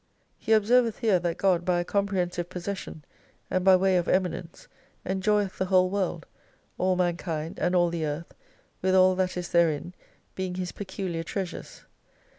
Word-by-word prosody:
He - - -4
observeth 225 +1 +3
here 215 -7 +2
that 175 -1 -2
God 185 -3 +2
by 180 -1 +1
a 175 - -2
comprehensive 180 -4 -1
possession, 180 -4 -6 0.5
and 185 - +1
by 190 0 +7
way 185 0 +3
of 175 - -1
eminence, 180 -2 -2 0.4
enjoyeth 195 +1 0
the 190 - +1
whole 185 -1 +3
world; 185 -4 -2 0.5
all 185 0 +2
mankind 170 -3 -2
and 180 +1 +1
all 175 -1 +4
the 170 -2 -2
Earth, 150 +3 -5 0.5
with 185 0 +2
all 185 0 +6
that 185 -1 -1
is 175 -1 -4
therein, 170 0 +1 0.4
being 185 -1 -4
His 180 -1 -3
peculiar 190 -4 -4
treasures. 180 +2 -6
185 Hz, 160 wpm, -27 LUFS, 175-190 Hz, 0.5 s, by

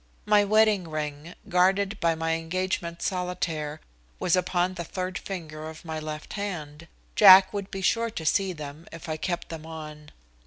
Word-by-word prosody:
My 210 0 +5
wedding 210 -3 +3
ring, 155 +1 -5
guarded 195 +2 +2
by 165 -2 +2
my 165 0 -1
engagement 170 +1 -2
solitaire, 180 -5 -2 0.4
was 175 - +2
upon 180 0 +1
the 175 -2 -5
third 185 +2 -4
finger 155 -5 -6
of 160 +1 -12
my 160 -1 -4
left 155 0 -6
hand. 170 -6 -5 0.3
Jack 190 -1 +9
would 200 -1 -4
be 195 - -5
sure 230 +4 +2
to 170 -8 -6
see 195 +4 +2
them 150 -1 -9
if 165 0 -9
I 155 -1 -2
kept 175 +2 -3
them 160 -1 -7
on. 150 -2 -9
170 Hz, 165 wpm, -26 LUFS, 155-190 Hz, 0.4 s, Jack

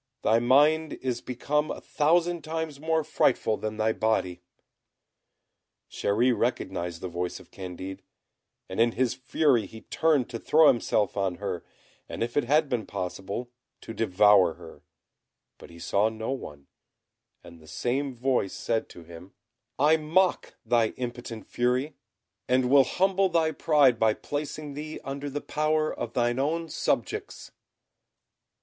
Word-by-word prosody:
Thy 115 +1 +4
mind 150 +6 +3
is 125 -2 -3
become 150 +4 -1
a - - -4
thousand 170 +3 +1
times 160 -2 -4
more 160 +1 0
frightful 125 -6 +1
than 110 0 -5
thy 110 0 +1
body." 95 -6 -1 1.5
Chéri 120 +5 +1
recognised 85 -5 -2
the 95 - -4
voice 90 0 -4
of - - -18
Candid, 95 +1 -7 0.7
and 95 - -6
in 115 0 +4
his 125 -1 +1
fury 130 -1 +1
he 110 - -12
turned 155 -6 +1
to 115 - -5
throw 155 +4 +5
himself 110 -4 +1
on 95 -3 -1
her, 95 -2 -4 0.5
and, - - -3
if 120 0 -4
it 145 - +2
had 150 +4 +3
been 120 -6 -2
possible, 95 +6 -5 0.3
to 115 - -8
devour 105 -5 +4
her; 85 -1 -13 0.8
but - - -13
he 85 - -14
saw 100 +5 +1
no 110 +2 -5
one, 75 - -7 0.8
and 85 -1 -13
the 80 - -17
same 130 - -2
voice 125 -5 0
said 115 -1 -2
to 85 - -12
him, 85 +3 -13 0.4
"I 150 +3 +4
mock 170 +4 +1
thy 115 -1 +2
impotent 120 -3 -6
fury, 125 +5 0 0.5
and 125 0 +2
will 140 -1 +7
humble 190 +1 +2
thy 165 -2 +2
pride 145 -6 +3
by 110 -1 +3
placing 150 0 -5
thee 155 +2 -6
under 140 +1 -5
the 145 +1 -4
power 155 0 0
of 120 - -5
thine 120 +1 +1
own 165 +4 -1
subjects." - - -2
125 Hz, 145 wpm, -27 LUFS, 105-150 Hz, 1.5 s, will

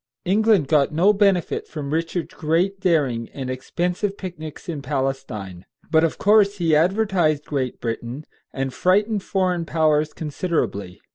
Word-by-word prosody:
England 205 -4 +3
got 145 -2 +3
no 180 +7 +4
benefit 195 -4 +1
from 145 -2 -5
Richard's 165 +2 -2
great 180 +4 0
daring 140 -11 +1
and 130 -2 -4
expensive 180 +9 -2
picnics 170 -3 -8
in 160 -5 -4
Palestine; 130 -9 -3 0.3
but 160 0 +4
of 165 - 0
course 205 -1 +4
he 165 -4 +2
advertised 175 -3 +2
Great 130 -4 -3
Britain, 120 +5 -4 0.3
and 135 -1 -3
frightened 200 - +2
foreign 185 -3 0
powers 155 -1 +1
considerably. 140 - -3
160 Hz, 135 wpm, -22 LUFS, 140-185 Hz, 0.3 s, no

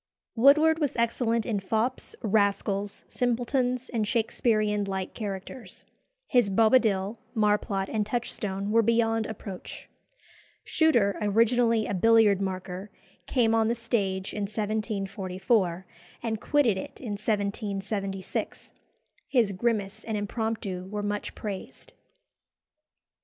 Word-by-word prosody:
Woodward 305 +6 +5
was 290 -4 0
excellent 230 -1 +1
in 220 -5 -1
fops, 220 +6 -2
rascals, 200 -1 0
simpletons, 245 +1 0
and 225 -3 -1
Shakesperean 215 -2 +1
light 190 -1 -3
characters. 205 +3 -7 0.4
His 245 -6 +3
Bobadil, 215 -1 +3 0.2
Marplot, 210 -2 +1
and 215 0 0
Touchstone 210 -3 -3
were 230 +1 +5
beyond 225 0 +2
approach. 200 -4 -8 0.7
Shuter, 235 -12 +3
originally 230 +2 +3
a - - -3
billiard 210 0 +4
marker, 185 +1 -4 0.4
came 230 -4 +2
on 225 -1 +3
the 235 - +1
stage 200 -5 -1
in 205 -1 -2
1744, 195 -3 -1 0.4
and 220 -2 -2
quitted 265 -9 +2
it - - -8
in 235 -5 -5
1776. 200 -2 -3 0.6
His 235 -7 +3
grimace 205 -1 -1
and 220 -2 -2
impromptu 205 -3 -3
were 210 0 -3
much 205 0 -3
praised. 200 -3 -7
215 Hz, 110 wpm, -27 LUFS, 200-230 Hz, 0.7 s, Woodward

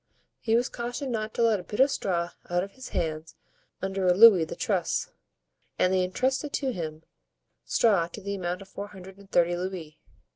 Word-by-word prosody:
He 225 0 +1
was 240 +1 +2
cautioned 245 +3 -4
not 220 -1 -2
to 235 - +2
let 225 -3 +3
a - - -8
bit 210 - -7
of 270 +2 +5
straw 175 -7 -1 0.2
out 175 0 +1
of 200 - -7
his 260 +5 -10
hands 155 -2 -3 0.5
under 190 -1 -1
a 180 - +5
louis 200 -5 +8
the - - -7
truss, - - -1 0.7
and 185 - +3
they 185 -1 +3
intrusted 260 +10 -1
to 265 -2 0
him 160 -3 -5 0.6
straw 200 -8 +3
to 175 - -9
the 200 +1 -4
amount 180 0 -3
of - - -18
four 200 +1 -7
hundred 190 -1 -12
and 200 -1 -16
thirty 175 -1 +3
louis. 175 -4 -5
190 Hz, 195 wpm, -27 LUFS, 175-225 Hz, 0.7 s, louis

